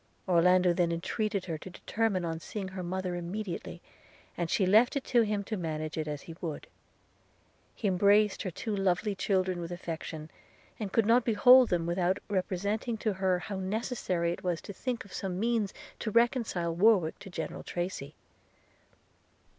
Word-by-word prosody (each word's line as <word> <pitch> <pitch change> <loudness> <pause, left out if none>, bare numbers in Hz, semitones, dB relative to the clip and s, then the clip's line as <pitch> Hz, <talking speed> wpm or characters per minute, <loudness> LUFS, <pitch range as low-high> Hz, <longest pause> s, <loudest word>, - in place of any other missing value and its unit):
Orlando 180 0 +4
then 170 -1 +1
entreated 200 +4 -2
her 165 -4 -4
to 190 - -9
determine 195 0 -1
on 165 -1 -3
seeing 195 +2 -5
her 185 0 -6
mother 180 +1 -3
immediately, 175 0 -5 0.5
and 170 -1 -2
she 190 - +2
left 220 +9 +5
it 280 - -1
to 240 - +3
him 210 -2 0
to 215 - -4
manage 155 -4 -3
it 155 -1 -3
as 150 -1 -4
he 165 - -9
would. 160 -5 -4 1.1
He 215 - -2
embraced 200 +2 +4
her 185 - -2
two 210 +5 -4
lovely 195 +1 +1
children 185 -2 0
with 170 0 -6
affection, 160 -2 -6 0.5
and 205 -3 -4
could 225 0 +3
not 235 +3 +5
behold 245 +3 +7
them, 170 -2 +1
without 175 +2 +1
representing 200 +4 -1
to 215 -1 -1
her 190 -1 +1
how 195 +2 -5
necessary 190 -3 -1
it 175 - -6
was 175 -2 0
to 200 - -7
think 250 +4 -3
of 200 - -14
some 185 -2 -3
means 225 -2 +1 0.3
to 220 - -2
reconcile 230 -7 +1
Warwick 185 -3 +3
to 195 - -10
General 170 -3 -5
Tracy. 175 -5 -4
185 Hz, 170 wpm, -30 LUFS, 175-215 Hz, 1.1 s, behold